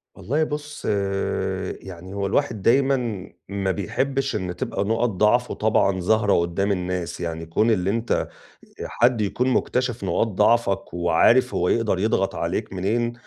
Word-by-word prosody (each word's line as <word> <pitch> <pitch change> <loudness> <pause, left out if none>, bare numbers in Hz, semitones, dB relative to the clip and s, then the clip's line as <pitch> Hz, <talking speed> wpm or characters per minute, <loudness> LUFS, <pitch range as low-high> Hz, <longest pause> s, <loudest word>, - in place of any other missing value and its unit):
والله 150 +6 -1
بُص، 150 0 -5 1.0
يعني 95 0 -10
هو 100 0 -2
الواحد 110 +1 0
دايمًا 120 -4 +1 0.2
ما 100 -1 -1
بيحبّش 135 +8 -1
إن 90 -4 -3
تبقى 95 - -2
نُقَط 115 +3 +1
ضعفه 105 +5 +2
طبعًا 100 -3 +1
ظاهرة 105 +2 +2
قُدّام 85 +4 +1
الناس. 90 -2 -3
يعني 80 -1 -4
كون 105 +8 +1
اللي 95 -3 +1
أنت 115 +3 -2 0.7
آآ - - -4
حد 120 -1 +2
يكون 115 +5 0
مُكتشِف 125 -3 0
نقاط 95 +5 +1
ضعفك 100 -2 +1
وعارف 85 +9 +3
هو 90 - +1
يقدر 110 -5 +1
يضغط 95 -2 0
عليك 85 +6 -3
منين، 115 +6 -1
105 Hz, 145 wpm, -23 LUFS, 95-120 Hz, 1.0 s, وعارف